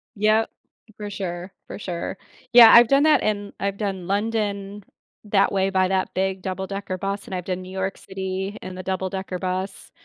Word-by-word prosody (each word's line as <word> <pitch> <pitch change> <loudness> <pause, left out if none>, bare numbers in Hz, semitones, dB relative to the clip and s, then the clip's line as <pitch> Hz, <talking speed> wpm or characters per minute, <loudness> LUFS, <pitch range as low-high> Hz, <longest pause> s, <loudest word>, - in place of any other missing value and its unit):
Yep. 215 +2 +2 0.5
For 210 -1 -5
sure. 185 -1 -5
For - - -7
sure. 180 0 -4 0.4
Yeah, 235 -2 +10
I've 235 0 +9
done 275 +3 +4
that, 305 -4 +5
and 205 -1 -1
I've 200 0 -2
done 195 -4 -3
London 205 -1 -2 0.4
that 200 -1 +3
way 195 -1 +1
by 185 -1 +3
that 190 0 -1
big 190 0 -1
double-decker 190 0 -4
bus, 200 +1 -3
and - - -8
I've 180 - -4
done 185 -1 -3
New 185 0 -10
York 190 0 -3
City 190 +1 -5
in 185 0 -7
the 185 - -7
double-decker 190 0 -3
bus. 185 +1 -4
195 Hz, 180 wpm, -23 LUFS, 185-205 Hz, 0.5 s, Yeah